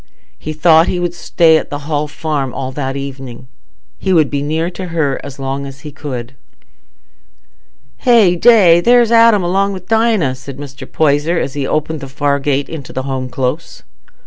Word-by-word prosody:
He 155 - -5
thought 160 +1 +4
he 180 - -1
would 175 -1 -2
stay 165 -2 +3
at - - -4
the 145 0 -6
Hall 150 -1 -1
Farm 150 -3 -3
all 130 -1 -4
that 135 -1 -4
evening. 135 -2 -8 0.5
He 190 - 0
would 155 -5 +3
be 140 -1 -1
near 160 +4 -2
her 165 -7 -2
as 140 - -9
long 135 +1 -4
as 135 0 -11
he 150 - -9
could. 135 -4 -7 1.6
"Hey 225 -8 +4
day! 180 -5 +5
There's 240 +2 +4
Adam 230 -4 +5
along 195 +3 0
wi' 190 - -7
Dinah," 220 - +2
said 130 +1 -10
Mr. 140 -2 -10
Poyser, 155 +2 +1
as 140 - -2
he 140 -2 -3
opened 155 +1 -2
the 135 - -8
far 140 +1 -1
gate 140 0 -1
into 150 -5 -8
the 130 - -4
Home 130 -1 -4
Close. 130 +6 -4
150 Hz, 175 wpm, -15 LUFS, 135-175 Hz, 1.6 s, day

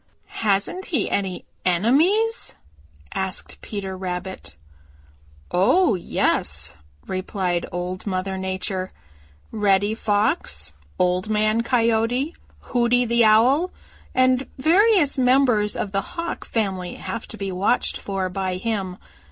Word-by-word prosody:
"Hasn't 210 - +1
he 285 - -1
any 190 -2 -2 0.2
enemies?" 310 - +2 0.6
asked 190 -1 -3
Peter 195 -3 -5
Rabbit. 185 - -5 1.0
"Oh, 230 - +4
yes," 75 - +1 0.3
replied 185 -2 -2
Old 180 +3 -4
Mother 190 0 -2
Nature. 190 0 -3 0.6
"Reddy 205 -1 +2
Fox, 205 - 0 0.2
Old 180 +3 +1
Man 215 +1 +2
Coyote, 235 +4 +1 0.3
Hooty 245 0 +2
the 235 0 +3
Owl 250 +11 +5 0.5
and 255 +1 +3
various 335 0 +4
members 250 -5 +3
of 200 - -3
the 195 0 0
Hawk 335 - -5
family 190 -5 -2
have 230 - -6
to 220 - -9
be 195 -2 -3
watched 190 +6 +1
for 195 -2 -2
by 185 0 -2
him. 190 -3 -3
210 Hz, 110 wpm, -23 LUFS, 185-245 Hz, 1.0 s, Owl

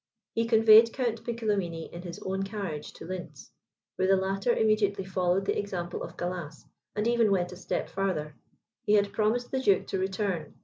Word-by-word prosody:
He 230 0 0
conveyed 225 0 +7
Count 235 -4 -2
Piccolomini 205 -8 -2
in 170 - -7
his 175 -1 -7
own 190 +1 -1
carriage 195 -7 -4
to - - -10
Lintz, 175 -6 -8 0.5
where 185 - +2
the 195 - +5
latter 195 +4 0
immediately 215 -4 +2
followed 185 0 0
the - - 0
example 180 -4 -4
of - - -7
Gallas, 175 -4 -5 0.3
and 210 +2 0
even 235 -2 +3
went 180 -2 +1
a - - -8
step 180 - -3
farther. 185 -6 -2 0.5
He 210 - +2
had 200 -1 +3
promised 225 +3 0
the 265 - 0
duke 200 -7 +3
to 190 - -1
return. 190 -4 -2
195 Hz, 180 wpm, -28 LUFS, 180-215 Hz, 0.5 s, conveyed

